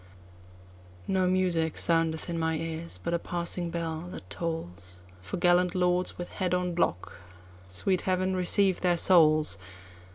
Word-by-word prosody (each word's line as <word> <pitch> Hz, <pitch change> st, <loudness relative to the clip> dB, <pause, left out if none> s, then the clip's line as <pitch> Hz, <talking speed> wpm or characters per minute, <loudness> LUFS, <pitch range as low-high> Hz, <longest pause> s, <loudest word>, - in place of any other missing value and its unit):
No 190 Hz, -1 st, +1 dB
music 180 Hz, -3 st, 0 dB
soundeth 165 Hz, -1 st, 0 dB
in 170 Hz, -1 st, -3 dB
my 160 Hz, 0 st, 0 dB
ears, 165 Hz, +1 st, -6 dB
but 170 Hz, -, -2 dB
a 170 Hz, -, +1 dB
passing 175 Hz, 0 st, -3 dB
bell 165 Hz, 0 st, -4 dB
that 95 Hz, -, -10 dB
tollsFor 90 Hz, -, -7 dB
gallant 175 Hz, +1 st, +3 dB
lords 180 Hz, 0 st, 0 dB
with 175 Hz, -, -6 dB
head 180 Hz, -2 st, -1 dB
on 180 Hz, -1 st, -1 dB
block—sweet 90 Hz, -, -3 dB
Heaven 185 Hz, 0 st, 0 dB
receive 185 Hz, +1 st, +2 dB
their 175 Hz, -1 st, +2 dB
souls! 155 Hz, -, +5 dB
170 Hz, 130 wpm, -28 LUFS, 155-180 Hz, -, souls